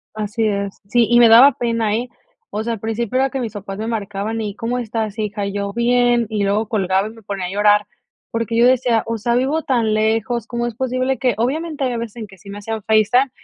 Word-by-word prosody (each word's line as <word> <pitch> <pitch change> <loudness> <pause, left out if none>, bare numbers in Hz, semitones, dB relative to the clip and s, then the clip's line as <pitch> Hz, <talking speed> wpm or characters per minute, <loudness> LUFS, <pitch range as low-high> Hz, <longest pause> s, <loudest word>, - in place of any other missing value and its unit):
Así 215 +1 -2
es. 200 -1 -3
Sí, 235 +1 +3
y 240 - +5
me 235 -1 +7
daba 250 +4 +8
pena, 230 -3 0
eh, 245 +2 -3 0.4
o 215 - -3
sea, 230 0 -2
al 220 - -6
principio 225 +2 -2
era 270 +1 +2
que 270 - -4
mis 225 -3 -4
papás 195 -1 -7
me 220 +1 -4
marcaban 215 0 -3
y: 210 -2 -4
"¿Cómo 245 +2 -2
estás, 220 -2 -3
hija?" 205 -1 -2
Y 200 - -4
yo: 200 0 -3
"Bien", 240 0 +2
y 210 -2 -1
luego 205 +2 0
colgaba 195 -2 0
y 220 - -8
me 225 0 -15
ponía 195 -2 -4
a - - -4
llorar. 205 +1 +3 0.5
Porque 230 0 -2
yo 235 - +5
decía: 250 -3 +3
"O 230 0 -2
sea, 235 +2 0
vivo 275 +6 +1
tan 230 -5 +1
lejos, 220 +2 0
¿cómo 240 0 -2
es 235 - -6
posible 255 +1 -1
que?" 250 -5 +1
Obviamente, 295 +5 -2
hay 250 -2 0
veces 230 -1 -6
en 215 -2 -6
que 195 0 -16
sí 200 - -14
me 200 - -7
hacían 220 +1 -4
FaceTime 220 +5 +3
225 Hz, 240 wpm, -19 LUFS, 210-240 Hz, 0.5 s, daba